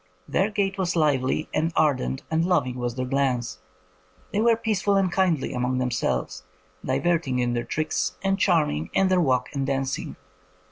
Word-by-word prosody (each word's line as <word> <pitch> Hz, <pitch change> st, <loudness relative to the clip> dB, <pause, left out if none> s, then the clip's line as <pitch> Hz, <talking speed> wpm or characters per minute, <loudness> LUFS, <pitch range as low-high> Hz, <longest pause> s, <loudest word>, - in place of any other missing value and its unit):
Their 195 Hz, +3 st, +1 dB
gait 195 Hz, -2 st, -1 dB
was 180 Hz, -2 st, 0 dB
lively, 150 Hz, -2 st, +1 dB
and 160 Hz, +2 st, +1 dB
ardent 135 Hz, -3 st, +1 dB
and 160 Hz, +1 st, +2 dB
loving 145 Hz, -9 st, 0 dB
was 120 Hz, -1 st, -2 dB
their 130 Hz, 0 st, -2 dB
glance.... 125 Hz, -7 st, -1 dB, 0.7 s
They 210 Hz, -, +1 dB
were 230 Hz, 0 st, +4 dB
peaceful 210 Hz, -3 st, 0 dB
and 195 Hz, -2 st, +2 dB
kindly 175 Hz, -7 st, +1 dB
among 125 Hz, +1 st, -1 dB
them 125 Hz, -1 st, -1 dB
selves, 65 Hz, -, -2 dB, 0.4 s
diverting 135 Hz, 0 st, 0 dB
in 120 Hz, -1 st, 0 dB
their 120 Hz, 0 st, -1 dB
tricks, 155 Hz, 0 st, -2 dB
and 195 Hz, 0 st, +1 dB
charm 170 Hz, -5 st, +3 dB
ing 75 Hz, +3 st, -4 dB
in 195 Hz, -1 st, +3 dB
their 185 Hz, -1 st, +3 dB
walk 130 Hz, -5 st, +1 dB
and 140 Hz, -2 st, -1 dB
dancing. 135 Hz, -1 st, -2 dB
150 Hz, 175 wpm, -25 LUFS, 125-185 Hz, 0.7 s, were